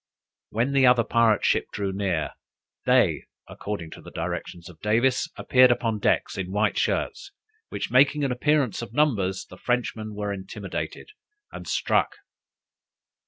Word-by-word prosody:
When 120 +5 0
the 135 -2 +4
other 125 -1 +5
pirate 115 -2 +2
ship - - +2
drew 100 -1 -2
near, 95 -5 -1 0.6
they, - - +3 0.2
according 95 -6 -6
to - - -10
the - - -11
directions 85 0 -5
of 85 -3 -14
Davis, 115 +6 +1
appeared 130 0 +5
upon 115 -3 0
deck - - +2
in 95 -1 -4
white 105 +2 +1
shirts, 395 +1 -2 0.4
which - - -4
making 140 +4 +4
an 135 - 0
appearance 135 -3 +1
of 115 -1 -8
numbers, 100 -10 +1
the 90 - -14
Frenchman 110 -2 -2
was 105 -1 -3
intimidated, 95 - -6 0.4
and - - -9
struck. - - +1
110 Hz, 145 wpm, -25 LUFS, 95-125 Hz, 0.6 s, other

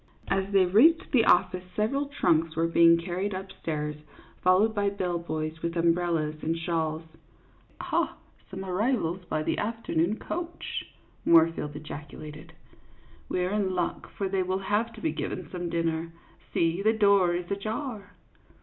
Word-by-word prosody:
As 195 0 0
they 195 -2 +5
reached 315 - +4
the 240 -5 +4
office 180 +1 +3
several 275 +7 0
trunks 165 - +1
were 165 +1 +2
being 170 0 +6
carried 185 +4 -3
up 190 +1 -6
stairs, 150 -4 -4 0.5
followed 190 +5 +4
by 205 -1 +1
bell 180 -3 -2
boys 155 -1 -4
with 170 0 -2
umbrel 170 +1 +2
las 155 -1 -2
and 165 +1 -1
shawls. 165 -1 -1 0.4
" - - -32
Ha, - - -1 0.3
some 190 0 -6
arrivals 185 -2 0
by 155 -2 -2
the - - -1
afternoon 210 -4 -1
coach! 345 0 -5 0.2
" - - -34
Moorfield 165 -3 +4
ejaculated. 150 0 -9 0.4
" - - -28
We 180 - 0
're 180 - -2
in 200 -3 0
luck, 175 -1 -2
for 195 - -3
they 190 0 0
will 185 +1 0 0.2
have 230 +2 +2
to - - -11
be 320 - 0
given - - -4
some 175 -1 -4
dinner; 165 0 -1 0.4
see, 165 +2 +1
the 220 +2 +3
door 200 -5 +4
is 175 +2 -4
ajar." 215 +2 -4
180 Hz, 165 wpm, -28 LUFS, 165-205 Hz, 0.5 s, being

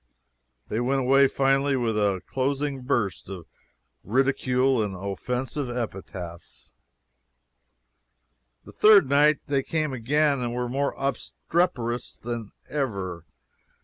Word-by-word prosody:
They 110 - -2
went 135 +3 +1
away 135 +2 +5
finally 135 +1 +2
with 120 -4 0
a 100 -3 +1
closing 135 +1 -2
burst 110 -9 -1
of 90 -4 -7 0.6
ridicule 130 +1 +2
and 100 -3 -2
offensive 125 +8 -3
epithets. 95 -7 -7 1.9
The - - -11
third 210 -7 +6
night 145 +2 +4
they 140 -1 +1
came 155 0 -2
again 140 +4 +1
and 120 -1 -3
were 125 0 -1
more 140 +3 -1
obstreperous 135 -3 -2
than 115 -2 -5 0.2
ever. 95 - -3
130 Hz, 110 wpm, -25 LUFS, 110-140 Hz, 1.9 s, third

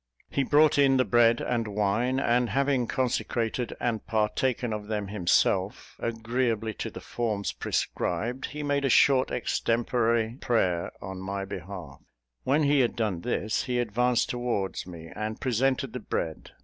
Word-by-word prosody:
He 140 - +1
brought 145 +2 +4
in 135 -1 +5
the 130 - +3
bread 120 -1 +4
and 115 -2 -1
wine; 105 +5 0
and 120 -2 +2
having 135 -3 +1
consecrated 120 -1 -1
and 115 -3 -1
partaken 115 +2 0
of 105 -1 -5
them 105 -2 -3
himself, 100 -4 +1
agreeably 115 -1 -1
to - - -4
the - - -9
forms 110 -4 -2
prescribed, 115 +10 -2
he 150 +1 -6
made 145 -1 0
a 135 - +2
short 130 +1 +5
extempore 115 0 0
prayer 90 -8 +1
in 95 0 -6
my 95 +1 -4
behalf. 95 -2 -8 0.4
When 145 +4 +2
he 145 0 +3
had 125 -3 +2
done 105 -7 -1
this, 110 -1 -1
he 125 -1 -1
advanced 120 +1 +1
towards 120 -8 -2
me, 85 -2 -10
and 110 +1 -4
presented 130 +1 0
the 125 - -4
bread. 80 -7 -4
115 Hz, 150 wpm, -27 LUFS, 105-130 Hz, 0.4 s, in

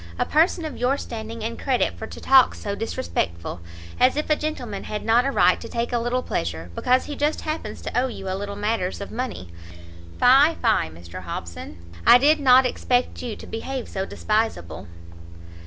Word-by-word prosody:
a - - +1
person 330 +2 +2
of 310 - -5
your 255 +3 +1
standing 225 -3 -6
and 230 +1 -4
credit 260 -3 0
for 220 - -7
to - - -10
talk 265 -1 +5
so 200 - -4
disrespectful! 85 - -3 0.4
as 255 +1 +4
if 305 +1 -1
a - - +6
gentleman 250 -10 -4
had 210 - -5
not 235 +3 +4
a 275 - +1
right - - +3
to - - -8
take 235 +1 -2
a 240 - +2
little 240 +2 -1
pleasure, 85 0 -3
because 255 - +2
he 295 - -6
just 295 +2 0
happens 310 +1 -5
to - - -6
owe 250 +2 +2
you 210 -6 -7
a 185 - -1
little 200 +1 -4
matters 205 -2 -1
of 200 - -7
money; 230 - -5 0.7
fie, 275 +6 +6
fie, 220 - +1
Mr 85 +3 -10
Hobson! 85 -2 -7 0.3
I 240 - +8
did 300 +4 +4
not 260 -2 +6
expect 250 0 0
you 235 -4 -4
to - - -11
behave 255 +2 -5
so 190 0 -4
despiseable!" 215 - -2
230 Hz, 190 wpm, -23 LUFS, 195-260 Hz, 0.7 s, I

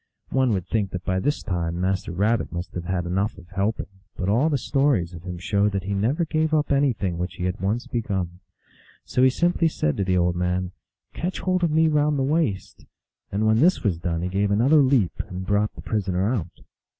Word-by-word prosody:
One 130 -2 +2
would 95 -4 -1
think 105 -4 0
that 90 -1 -5
by 95 0 0
this 145 +9 -1
time 85 -3 -2
Master 95 -1 -1
Rabbit 105 +6 0
must 85 +1 -5
have 85 -1 -5
had 90 -1 -1
enough 95 +5 -1
of 90 -2 -14
helping, 100 +4 -1 0.3
but 95 +1 -1
all 125 +10 +3
the 145 - +1
stories 130 - +1
of 85 - -9
him 90 0 -6
show 100 +3 +1
that 100 -2 -3
he 100 +1 -3
never 125 - +1
gave 155 0 +1
up 150 -1 +1
anything 115 -11 +1
which 90 +1 -3
he 90 - -5
had 90 0 -2
once 105 +5 -1
begun. 95 -7 -3 0.7
So 125 - 0
he 130 - +7
simply 170 +4 +2
said 75 - -1
to 100 - +1
the 90 -1 +1
old 90 0 +2
man, 90 +1 -1 0.2
" - - -51
Catch 180 +3 -3
hold 185 -1 0
of 170 - +3
me 160 +1 +3
round 150 -1 +2
the 135 - +1
waist; 135 - -1 0.2
" - - -54
and 105 +2 0
when 110 +1 +4
this 180 +7 +3
was 95 -7 0
done 85 -1 -2
he 90 - -1
gave 100 +2 0
another 120 +10 +4
leap, 130 -9 +2
and 95 0 -6
brought 105 +2 +1
the - - -9
prisoner 100 0 0
out. 90 -9 -5
100 Hz, 225 wpm, -24 LUFS, 90-135 Hz, 0.7 s, he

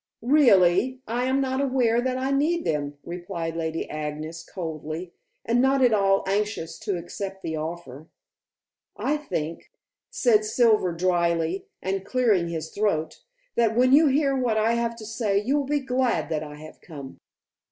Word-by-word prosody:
"Really, 245 - +4
I 240 +3 -1
am 260 +1 +1
not 265 0 0
aware 250 -4 +2
that 255 0 -1
I 265 +1 -1
need 315 +5 +1
them," 145 -2 -2
replied 170 -1 -5
Lady 165 0 -3
Agnes 155 +2 -5
coldly, 165 0 -6 0.3
and 235 +2 +2
not 265 0 +3
at 245 -3 +5
all 195 -1 +3
anxious 195 -4 -2
to 205 -4 -2
accept 190 +3 -6
the 160 - -3
offer. 155 -2 -7 0.9
"I 300 - 0
think," 165 - -4 0.4
said 220 -4 +3
Silver 215 -4 +3
dryly, 170 0 0 0.2
and 190 0 -2
clearing 215 -8 +1
his 160 -1 -4
throat, 200 -7 -1 0.3
"that 225 -2 +2
when 255 +2 +4
you 305 +2 +7
hear 275 0 +2
what 245 -4 +1
I 220 +2 +2
have 235 0 -1
to 225 -2 -10
say 220 -2 -1
you 250 +8 0
will 285 -2 0
be 295 +1 +1
glad 255 -5 0
that 155 -2 -1
I 150 -1 -8
have 155 +1 -12
come." 140 -5 -10
205 Hz, 165 wpm, -25 LUFS, 165-255 Hz, 0.9 s, you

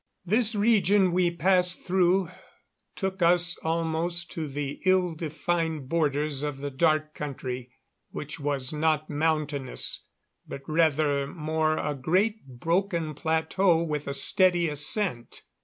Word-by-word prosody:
This 220 +4 +2
region 205 -3 +3
we 180 0 +2
passed 180 +1 +1
through 185 0 +2 0.7
took 190 -1 -4
us 175 0 +3
almost 165 +1 -1
to 160 -2 -4
the 145 0 -5
ill 185 -2 +2
defined 160 -2 -3
borders 150 -3 0
of 145 -2 -3
the 140 +1 -5
Dark 155 +1 +1
Country. 130 -3 -6 0.4
It 150 +2 -6
was 140 -2 -2
not 155 0 0
mountainous, 150 -3 -1 0.5
but 135 - -7
rather 155 -3 +1
more 155 +1 -1
a 150 - -2
great 185 - 0
broken 165 +5 -1
plateau 160 +3 +1
with 150 -3 -3
a 140 - -2
steady 175 +3 +4
ascent. 150 - -2
160 Hz, 125 wpm, -26 LUFS, 145-180 Hz, 0.7 s, steady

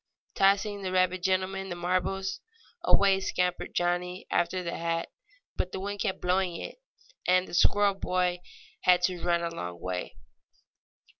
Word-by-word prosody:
Tossing 200 +1 +2
the 185 -1 -3
rabbit 185 0 +2
gentleman 190 +1 0
the 175 - -3
marbles, 185 +2 -1 0.4
away 195 -1 +4
scampered 180 -1 -1
Johnnie 180 +1 -1
after 180 +2 +1
the 170 - -3
hat. 165 0 -2 0.5
But 180 - -2
the - - -3
wind 200 +1 -4
kept 195 -3 0
on - - -27
blowing 180 -1 +1
it, - - -7 0.5
and 185 0 +4
the - - -11
squirrel 205 +3 +4
boy 180 -2 0 0.4
had 180 -1 +4
to 180 -1 0
run 170 -1 +1
a 170 - -2
long 90 - -6
way. 90 0 -4
185 Hz, 155 wpm, -29 LUFS, 175-190 Hz, 0.5 s, away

